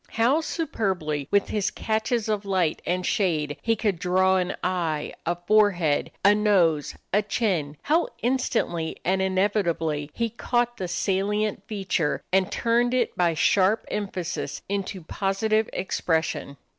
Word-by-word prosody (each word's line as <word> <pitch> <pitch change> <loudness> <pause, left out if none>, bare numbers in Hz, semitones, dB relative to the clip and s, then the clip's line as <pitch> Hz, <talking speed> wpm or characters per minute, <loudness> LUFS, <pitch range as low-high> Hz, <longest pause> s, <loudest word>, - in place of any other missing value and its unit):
How 250 +8 +3
superbly 190 - -2
with 200 -1 +2
his 210 -2 0
catches 220 +1 -1
of 210 -2 -1
light 185 -5 0
and 180 0 0
shade 155 -7 0
he 225 0 +1
could 205 -5 -1
draw 185 +1 +3
an 180 0 -1
eye, 165 -5 -1
a 175 - +1
forehead, 175 -4 +2 0.2
a 205 - +8
nose, 185 -8 +2 0.2
a 205 - +4
chin! 180 -9 -1
How 325 +4 +2 0.2
instantly 230 -10 0
and 190 +2 +2
inevitably 185 -6 0
he 230 -1 -1
caught 240 +1 -1
the 185 - -3
salient 200 +3 0
feature 190 -7 -1
and 190 -1 +3
turned 240 +2 +1
it 245 -3 0
by 170 -2 +2
sharp 195 +6 +3
emphasis 190 -4 -4
into 195 -2 -3
positive 215 +5 0
expression! 160 -5 -1
195 Hz, 135 wpm, -25 LUFS, 175-215 Hz, 0.2 s, a